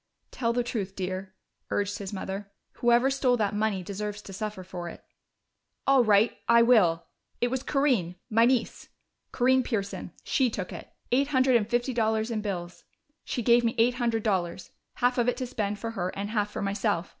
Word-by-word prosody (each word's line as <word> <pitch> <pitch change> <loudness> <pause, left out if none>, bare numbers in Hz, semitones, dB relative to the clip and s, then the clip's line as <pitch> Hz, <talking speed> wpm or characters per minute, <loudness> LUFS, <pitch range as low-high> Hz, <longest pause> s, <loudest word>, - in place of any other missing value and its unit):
"Tell 230 -2 0
the 245 +1 0
truth, 200 -5 -4
dear," 190 0 -4 0.3
urged 205 0 -1
his 195 -2 -6
mother. 195 0 -5 0.3
"Whoever 240 +2 +4
stole 260 -2 +2
that 210 -2 0
money 210 -3 0
deserves 210 +2 -5
to 195 - -10
suffer 210 -1 -5
for 175 -1 -6
it." - - -12 0.8
"All 270 -2 +5
right 215 +1 +4
I 235 0 +7
will! 185 -9 +4 0.3
It 245 - +1
was 260 -1 -1
Corinne 255 - +1
my 225 +1 +4
niece, 245 -1 0 0.4
Corinne 260 +1 +3
Pearson. 205 -5 -3
She 260 -3 +2
took 195 -4 -5
it. - - -9 0.2
Eight 275 +3 +3
hundred 260 -3 +3
and 220 -2 +2
fifty 240 +2 0
dollars 220 0 0
in 220 -2 -1
bills. 180 -4 -5 0.4
She 245 - -3
gave 235 +1 +5
me 230 0 0
eight 235 +2 +4
hundred 230 -2 0
dollars 185 -4 -1 0.2
half 245 +1 +1
of 240 +1 +3
it - - -2
to 255 - -2
spend 210 -4 -2
for 225 +2 -4
her, 185 -5 -2
and 205 +1 -3
half 210 -2 0
for - - -4
myself. 200 -3 -1
220 Hz, 190 wpm, -27 LUFS, 200-240 Hz, 0.8 s, I